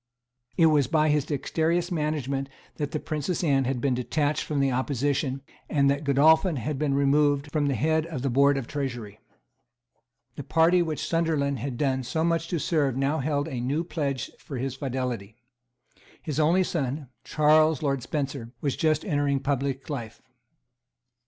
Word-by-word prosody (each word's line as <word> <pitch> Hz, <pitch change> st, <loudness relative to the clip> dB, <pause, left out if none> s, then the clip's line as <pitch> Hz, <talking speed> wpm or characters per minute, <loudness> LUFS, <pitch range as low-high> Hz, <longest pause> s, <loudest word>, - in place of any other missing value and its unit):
It 165 Hz, -, +5 dB
was 150 Hz, -5 st, +4 dB
by 155 Hz, +1 st, +2 dB
his 150 Hz, -2 st, +2 dB
dexterous 165 Hz, +4 st, -1 dB
management 145 Hz, -4 st, -2 dB, 0.3 s
that 145 Hz, -2 st, -2 dB
the 155 Hz, -, -3 dB
Princess 155 Hz, +4 st, -3 dB
Anne 135 Hz, -4 st, +2 dB
had 130 Hz, 0 st, -1 dB
been 135 Hz, +1 st, +1 dB
detached 145 Hz, +4 st, 0 dB
from 150 Hz, -2 st, -2 dB
the 135 Hz, -1 st, +2 dB
opposition, 135 Hz, +1 st, -1 dB, 0.3 s
and 140 Hz, -2 st, +3 dB
that 140 Hz, +2 st, -2 dB
Godolphin 160 Hz, +5 st, +4 dB
had 135 Hz, +3 st, -3 dB
been 145 Hz, -2 st, +1 dB
removed 145 Hz, +1 st, +2 dB
from 150 Hz, -2 st, +1 dB
the 140 Hz, -, +1 dB
head 160 Hz, +6 st, +1 dB
of 155 Hz, -7 st, -5 dB
the 135 Hz, -, +1 dB
hoard 140 Hz, +2 st, +4 dB
of 135 Hz, -, -3 dB
Treasury. 120 Hz, -7 st, -5 dB, 1.2 s
The 145 Hz, -, -5 dB
party 165 Hz, +5 st, +3 dB
which 160 Hz, -3 st, -2 dB
Sunderland 155 Hz, -5 st, 0 dB
had 125 Hz, 0 st, -4 dB
done 130 Hz, -2 st, 0 dB
so 145 Hz, +6 st, -2 dB
much 165 Hz, 0 st, 0 dB
to 175 Hz, -, -1 dB
serve 145 Hz, -5 st, 0 dB
now 140 Hz, +3 st, 0 dB
held 145 Hz, +1 st, -1 dB
a 130 Hz, -6 st, -4 dB
new 140 Hz, +7 st, -1 dB
pledge 140 Hz, -7 st, -3 dB
for 140 Hz, -, -7 dB
his 130 Hz, +1 st, -2 dB
fidelity. 125 Hz, -6 st, -4 dB, 0.9 s
His 155 Hz, -3 st, -3 dB
only 170 Hz, +5 st, +4 dB
son, 140 Hz, -5 st, -3 dB
Charles 155 Hz, 0 st, +3 dB
Lord 140 Hz, -2 st, 0 dB
Spencer, 135 Hz, -4 st, -4 dB
was 140 Hz, 0 st, -1 dB
just 155 Hz, -1 st, +1 dB
entering 145 Hz, -2 st, +1 dB
on 135 Hz, -, -6 dB
public 135 Hz, -1 st, -2 dB
life. 120 Hz, -7 st, -6 dB
145 Hz, 170 wpm, -26 LUFS, 135-155 Hz, 1.2 s, It